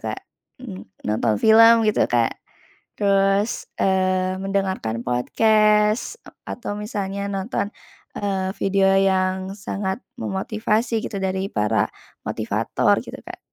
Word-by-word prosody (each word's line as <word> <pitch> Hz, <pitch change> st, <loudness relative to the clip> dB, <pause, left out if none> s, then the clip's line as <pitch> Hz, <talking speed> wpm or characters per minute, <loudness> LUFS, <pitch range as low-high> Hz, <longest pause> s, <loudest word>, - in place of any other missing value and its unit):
Kak, -, -, -4 dB, 0.4 s
mmm, 95 Hz, +1 st, -9 dB, 0.2 s
nonton 105 Hz, 0 st, +1 dB
film 225 Hz, -, +6 dB
gitu, 215 Hz, -, +1 dB
Kak, 120 Hz, -2 st, +2 dB, 0.7 s
terus, 195 Hz, +1 st, +1 dB
eee, 185 Hz, -1 st, +1 dB
mendengarkan 190 Hz, -, -2 dB
podcast, 210 Hz, -, +2 dB
eee, -, -, -15 dB
atau 205 Hz, -4 st, -5 dB
misalnya 200 Hz, -1 st, -4 dB
nonton, 200 Hz, +1 st, -2 dB, 0.5 s
eee, 190 Hz, -2 st, -1 dB
video 195 Hz, 0 st, +3 dB
yang 190 Hz, 0 st, 0 dB
sangat 195 Hz, +2 st, -4 dB, 0.2 s
memotivasi 220 Hz, +3 st, -1 dB
gitu 200 Hz, -3 st, -5 dB
dari 190 Hz, +1 st, -1 dB
para 105 Hz, -, +1 dB, 0.4 s
motivator -, -, 0 dB
gitu, -, -, -9 dB
Kak. -, -, -9 dB
195 Hz, 110 wpm, -22 LUFS, 185-210 Hz, 0.7 s, film